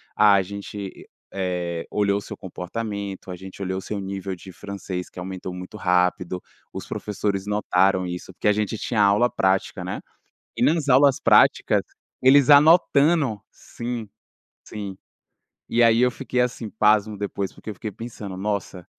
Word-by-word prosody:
“A 105 -2 +6
gente, 100 0 -8 0.3
eh, 90 -3 -2
olhou 100 -1 +1
o - - -9
seu - - -9
comportamento, 100 +1 -5
a - - -5
gente 95 +2 -10
olhou 95 0 -2
o - - -8
seu 105 +1 -4
nível 95 0 -4
de 95 +2 -12
francês 95 -2 -6
que - - -21
aumentou 95 0 -6
muito 90 +4 -9
rápido, 90 -1 +1 0.3
os - - -6
professores 100 -1 -3
notaram 95 -2 +2
isso”, 90 +1 -6
porque 105 - -2
a - - +5
gente 105 +1 -2
tinha 110 0 0
aula 100 +4 +4
prática, 95 -5 0
né. - - -5 0.6
E - - -1
nas 155 -2 +2
aulas 135 +1 +5
práticas - - +4 0.4
eles 135 +1 +6
anotando 145 - +5
sim, 120 -1 -6 0.6
sim, 100 -3 -7 0.7
e 120 - +1
aí 115 0 +5
eu 125 - +4
fiquei 125 0 -2
assim 125 -2 -1
pasmo 105 0 +2
depois 100 -1 -3
porque 110 - -9
eu - - -6
fiquei 105 +2 -6
pensando: 105 -3 -8
“Nossa!”, 100 -2 -3
100 Hz, 160 wpm, -23 LUFS, 95-115 Hz, 0.7 s, A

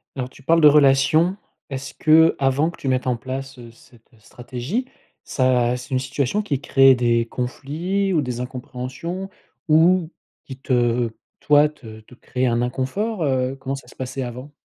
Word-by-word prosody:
Alors 130 -2 -4
tu 140 - -18
parles 165 +3 +3
de 150 - +8
relation. 150 +5 +4 0.3
Est-ce 135 0 -6
qu'avant 155 -2 +3
que 170 - -12
tu 135 - -7
mettes 130 0 0
en 125 -2 +1
place, 135 +2 -6
heu, 120 -1 -12
cette 115 0 -22
stratégie, 125 - -5 0.4
ça 125 -2 +1
c'est 125 +2 -9
une 130 - 0
situation 135 +9 -1
qui 140 -8 -2
crée 135 -1 +5
des 120 -1 +1
conflits 160 +11 -3
ou 160 - +2
des 125 -3 -4
incompréhensions 130 +9 -6 0.4
ou 165 +2 +4 0.3
qui 130 - -9
te 120 -2 +1 0.3
toi, 150 0 +4
te 110 -8 -12
te 110 - -19
crée 125 +1 -3
un 120 -1 +1
inconfort? 160 - -2
Heu, 130 -1 0
comment 135 +1 -4
ça 135 - -11
se - - -16
passait 130 +1 -5
avant? 125 +3 -7
135 Hz, 170 wpm, -21 LUFS, 125-150 Hz, 0.4 s, de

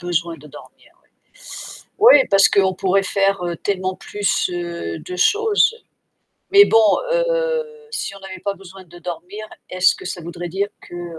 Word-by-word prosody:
besoin 170 -1 -2
de 150 - -15
dormir, - - -16
ouais. - - -36 1.1
Oui, 270 - +4
parce 195 0 +6
qu'on 190 -1 +2
pourrait 195 +1 +1
faire, 195 -2 0
heu, 170 -1 -3
tellement 185 0 -3
plus, 205 -3 -1
heu, 170 - -5
de 180 - -8
choses. 430 - +2 0.8
Mais 405 0 +8
bon, 225 - +4 0.3
heu, - - 0 0.3
si 430 - -4
on - - -11
n'avait 190 -1 -9
pas 200 -1 -1
besoin 190 0 -13
de 175 0 -15
dormir, 180 +5 -7 0.2
est-ce 185 0 +3
que - - -12
ça 180 -1 -5
voudrait 175 +1 -7
dire 195 +4 -2
que, - - -13
heu, 175 -2 -7
190 Hz, 170 wpm, -20 LUFS, 175-205 Hz, 1.1 s, Mais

